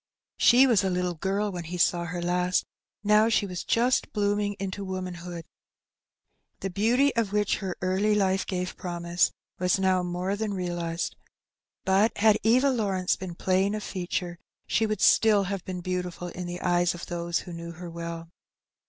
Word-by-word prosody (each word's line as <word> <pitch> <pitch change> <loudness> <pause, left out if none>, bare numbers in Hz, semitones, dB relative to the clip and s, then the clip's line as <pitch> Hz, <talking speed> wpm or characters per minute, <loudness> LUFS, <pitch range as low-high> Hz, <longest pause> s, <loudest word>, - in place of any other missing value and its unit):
She 250 +3 +7
was 230 -6 +3
a 190 - +1
little 180 -1 -1
girl 195 +5 -1
when 175 -2 -6
he 180 +2 -5
saw 175 0 +2
her 175 +1 -4
last, 180 +1 +1 0.4
now 210 +2 +5
she 210 -2 +2
was 180 -3 -5
just 245 +2 +1
blooming 205 -1 0
into 195 0 -5
womanhood. 180 -3 -5 1.2
The 195 - -3
beauty, 240 +9 +2
of 225 -4 0
which 210 -1 +1
her 190 -3 -4
early 195 +3 +2
life 190 -2 +1
gave 180 -1 -3
promise, 175 0 0 0.3
was 180 +1 +2
now 190 -1 +2
more 180 +2 -2
than 210 -1 -2
realized. 175 -2 -3 0.7
But 195 +4 +3
had 215 0 +4
Eva 255 +5 +4
Lawrence 195 -7 0
been 185 -2 -7
plain 190 +3 +1
of 210 - -4
feature, 175 -1 -4 0.3
she 220 - +1
would 215 0 -2
still 215 -3 +5
have 195 -1 -4
been 180 -1 -5
beautiful 180 -1 -3
in 180 0 -6
the 175 0 -6
eyes 175 -1 +2
of 170 - -7
those 170 -1 -2
who 175 - -9
knew 170 0 -7
her 175 +1 -9
well. 170 0 -6
185 Hz, 170 wpm, -27 LUFS, 175-205 Hz, 1.2 s, She